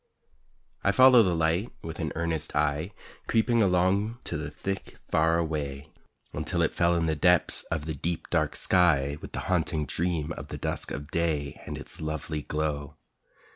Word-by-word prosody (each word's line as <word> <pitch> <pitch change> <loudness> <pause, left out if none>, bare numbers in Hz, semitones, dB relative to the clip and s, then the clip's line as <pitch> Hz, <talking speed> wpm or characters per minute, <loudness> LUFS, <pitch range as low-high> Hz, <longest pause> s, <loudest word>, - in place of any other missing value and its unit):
I 100 - +4
follow 130 +2 +8
the 90 -5 +2
light 85 +7 +1
with 80 0 -6
an 80 -3 -2
earnest 80 -2 -1
eye, 75 +4 0 0.4
Creeping 115 +1 +3
along 100 +4 +2
to - - -4
the 75 -1 -3
thick 95 +6 -5
far 80 +1 +3
away, 75 -3 -3 0.4
Until 80 +3 -1
it 80 - 0
fell 85 0 +2
in 85 -1 +1
the 80 -1 +1
depths 90 +3 +3
of 80 -3 -3
the 80 - -3
deep, 85 +4 -3
dark 75 -3 +1
sky 75 -6 +2
With - - -9
the - - -3
haunting 80 -4 0
dream 80 0 -1
of - - -6
the - - -6
dusk - - -1
of 75 +2 -6
day 80 -5 -1
And - - -4
its - - -6
lovely 75 0 -3
glow. 75 -1 -3
80 Hz, 175 wpm, -28 LUFS, 75-90 Hz, 0.4 s, follow